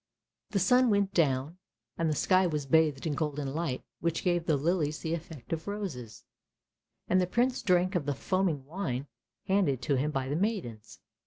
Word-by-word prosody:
The 205 - -1
sun 250 +7 +4
went 200 -2 +2
down 150 +1 +1 0.4
and 165 -1 0
the 155 - 0
sky 185 +4 +3
was 150 -4 -2
bathed 150 0 +3
in 155 - 0
golden 145 -2 -2
light 155 -5 -2 0.2
which 165 -1 -1
gave 175 -2 +1
the 155 - +3
lilies 155 0 0
the 160 -1 -3
effect 160 -5 -6
of 160 +2 -4
roses; 165 - -5 0.8
and 185 0 +3
the 180 - 0
Prince 245 +6 +1
drank 185 0 +2
of 165 -6 -1
the 145 - 0
foaming 175 -4 0
wine 140 -5 -3 0.4
handed 190 -10 +2
to 135 +2 +1
him 145 +4 0
by 135 -3 -2
the 140 - -1
maidens. 170 - -3
160 Hz, 180 wpm, -30 LUFS, 140-185 Hz, 0.8 s, sun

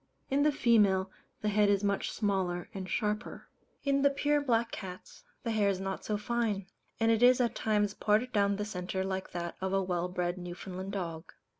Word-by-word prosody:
In 275 +1 +3
the 300 +1 +4
female, 205 -8 +3 0.3
the 210 - 0
head 210 0 +3
is 200 0 +2
much 200 -1 0
smaller 190 -4 -1
and 190 -2 -5
sharper. 210 +4 -2 0.4
In 275 -1 +2
the 280 - +5
pure 290 +1 +1
Black 235 -4 +1
cats, 185 - -8 0.2
the 230 - -1
hair 210 -2 +2
is 190 -2 -1
not 190 0 -4
so 210 - -1
fine; 215 -3 -1 0.3
and 225 0 +4
it 225 0 +2
is 250 +1 +7
at 235 -2 +2
times 210 -3 +1
parted 220 +5 +1
down 200 -1 +3
the 205 +1 -3
centre 190 -2 -3
like 190 0 -3
that 170 -1 -4
of 190 0 -1
a 195 0 +2
well 180 -1 -1
bred 180 0 -2
Newfoundland 185 +2 -6
dog. 170 -4 -5
200 Hz, 195 wpm, -31 LUFS, 190-225 Hz, 0.4 s, is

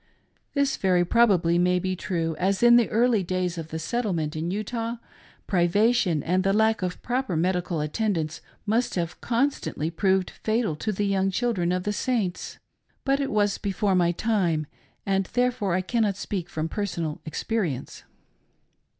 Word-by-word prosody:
This 280 -1 +1
very 180 -2 +2
probably 180 -6 +3
may 180 0 +3
be 185 +1 -1
true, 165 -3 -2
as 190 +3 +1
in 240 0 +8
the 240 -2 +4
early 230 -1 +3
days 180 -1 -2
of 160 - -6
the 160 - -5
settlement 165 -5 -2
in 160 +2 -2
Utah, 225 +4 -3 0.5
priva 200 +5 +3
tion 175 - +1
and 185 +2 +1
the 195 0 +2
lack 220 0 +3
of 180 -1 -3
proper 250 -6 -1
medical 175 -1 0
attendance 165 -1 -1 0.2
must 225 +4 0
have 175 -1 -3
constantly 235 - -1
proved 190 +1 +1
fatal 220 -6 -1
to 215 - -2
the 205 +1 -1
young 195 -1 +1
children 195 -4 0
of 180 0 -1
the 210 - -1
Saints. 210 -6 -2 0.5
But 275 0 +2
it 275 -1 -1
was 205 -3 +1
before 200 0 0
my 175 -2 +3
time, 175 -6 0 0.4
and 195 -1 +1
therefore 245 -6 +1
I 185 - +1
cannot 205 0 0
speak 195 -3 -4
from 160 -3 -2
personal 170 -6 -3
experience. 160 - -3
190 Hz, 160 wpm, -25 LUFS, 175-225 Hz, 0.5 s, in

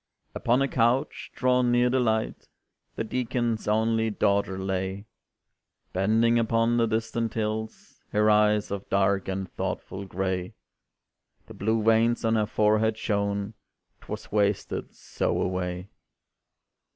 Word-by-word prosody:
Upon 125 +3 +2
a - - +1
couch 125 +3 0
drawn 125 -1 +2
near 120 0 +4
the 130 +1 +2
light, 110 -2 -1 0.5
The - - -2
Deacon's 120 -1 -2
only 110 +1 +2
daughter 100 -2 +1
lay, 95 +1 -3 0.9
Bending 115 +5 +3
upon 115 +1 +2
the 115 -1 +3
distant 115 +1 -2
hills 110 0 -4
Her 105 0 +2
eyes 105 -1 +3
of 100 -1 -5
dark 100 0 +1
and 95 0 -3
thoughtful 95 +1 -4
gray; 95 -1 -3 0.9
The - - -12
blue 110 +2 0
veins 115 +1 +3
on 110 - +2
her 110 -2 +1
forehead 110 +1 +2
shone 100 -1 -1 0.5
'Twas - - -8
wasted 100 -1 -1
so - - -2
away. 90 0 -3
110 Hz, 125 wpm, -26 LUFS, 100-115 Hz, 0.9 s, near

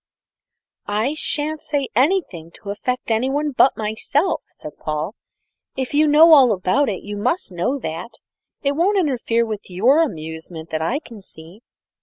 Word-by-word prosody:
"I 215 +7 0
shan't 310 0 -1
say 285 -3 -2
anything 255 - +1
to 200 - -7
affect 250 +3 -3
anyone 270 +6 0
but 265 0 +3
myself," 225 - -1
said 150 - -10
Paul; 155 +5 -3 0.6
"if 260 0 -3
you 305 +1 +4
know 315 +3 +7
all 265 -6 +7
about 210 +9 +1
it, 195 - -4
you 205 0 -6
must 210 - -1
know 180 +11 -1
that 175 - -6 0.5
it 280 - +2
won't 355 +8 +1
interfere 245 -8 +1
with 215 -3 -6
your 240 - +3
amusement 160 - -5
that 155 0 -2
I 230 - 0
can 235 -8 -11
see." 170 +2 -15
235 Hz, 155 wpm, -21 LUFS, 185-290 Hz, 0.6 s, know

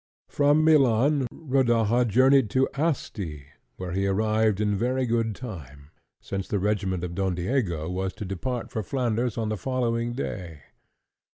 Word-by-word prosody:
From 145 +2 +3
Milan, 140 -2 +4
Rodaja 120 -5 +2
journeyed 130 +1 +4
to 130 +5 +2
Asti, 105 - -3 0.3
where 90 -1 -5
he 95 +2 0
arrived 110 +1 +1
in 105 -1 +1
very 125 +5 0
good 115 -2 0
time, 75 - -9 0.3
since 95 -1 -4
the 105 - -1
regiment 95 -3 -1
of 90 -1 -4
Don 95 0 -1
Diego 85 - -1
was 95 +1 -2
to 105 - -6
depart 115 +6 -4
for 110 - -2
Flanders 120 0 -1
on 110 -2 -1
the 110 - -2
following 120 -2 -1
day. 85 - -6
110 Hz, 150 wpm, -26 LUFS, 95-130 Hz, 0.3 s, Milan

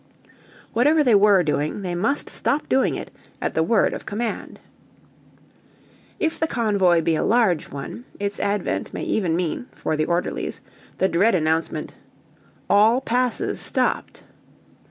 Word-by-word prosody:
Whatever 295 +7 +4
they 245 -5 +3
were 200 -2 +5
doing, 150 +5 -1
they 180 -2 -3
must 220 +12 0
stop 290 - -1
doing 265 - +2
it - - -7 0.3
at - - -2
the 160 - +1
word 205 +7 +2
of - - -6
command. 225 +2 -4 1.6
If 320 0 -1
the 320 - +1
convoy 200 - +2
be 165 - +1
a 155 - 0
large 215 -9 +2
one, 145 - -7
its 200 0 -2
advent 200 -2 -2
may - - -4
even 180 -7 0
mean, 180 +8 -2
for - - -2
the 155 0 0
orderlies, 175 +1 -2 0.4
the 190 - +2
dread 190 +5 +3
announcement, 160 -1 -1 0.7
"All 215 +5 +5
passes 250 -1 -1
stopped." - - -1
200 Hz, 140 wpm, -22 LUFS, 170-235 Hz, 1.6 s, were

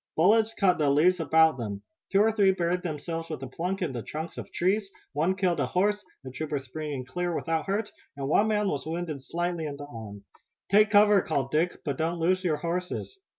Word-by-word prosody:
Bullets 220 +6 +4
cut 185 -4 +3
the 150 -2 +3
leaves 170 +6 +4
about 160 -3 +4
them. 100 -3 -5 0.3
Two 195 - +4
or 220 +1 +4
three 200 -3 +4
buried 180 0 0
themselves 165 0 -4
with 155 -4 -5
a - - -4
plunk 180 +8 -3
in 160 - -1
the 120 - -4
trunks 160 +7 -6
of - - -8
trees, 195 +3 0 0.2
one 160 +6 +1
killed 185 -3 +1
a - - +1
horse, 205 +3 +1 0.2
the 130 - -7
trooper 150 +3 -3
springing 140 0 -5
clear 175 +5 -2
without 160 -1 -1
hurt, 205 +2 -1 0.3
and 135 -1 -3
one 205 +9 +3
man 210 -1 +1
was 145 -4 -2
wounded 160 -3 -4
slightly 170 +2 -2
in 140 -1 -6
the 145 - -7
arm. 110 -7 -9 0.5
"Take 210 +1 +6
cover," 205 -1 +6
called 135 -6 -2
Dick, 165 +4 0
"but 140 -3 -2
don't 165 +2 0
lose 185 +3 +1
your 160 -4 +1
horses!" 180 - -4
170 Hz, 210 wpm, -27 LUFS, 150-190 Hz, 0.5 s, Take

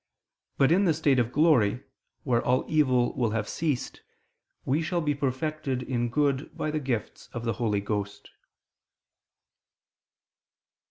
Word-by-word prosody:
But 135 +2 +4
in 195 +4 +4
the 165 -4 +3
state 145 -4 +2
of 120 -1 0
glory, 130 -6 +3 0.4
where 120 -5 +1
all 125 +1 +1
evil 130 -6 +2
will 120 -4 +1
have 105 -1 -2
ceased, 150 -6 -3 0.6
we 145 +5 +1
shall 170 +2 -1
be 150 -3 0
perfected 140 -1 -2
in 120 -2 -1
good 140 +2 0
by 155 - -2
the 155 - -1
gifts 130 -6 -4
of 120 -1 -5
the 115 - 0
Holy 105 -3 +1
Ghost. 105 0 -4
130 Hz, 140 wpm, -27 LUFS, 120-150 Hz, 0.6 s, But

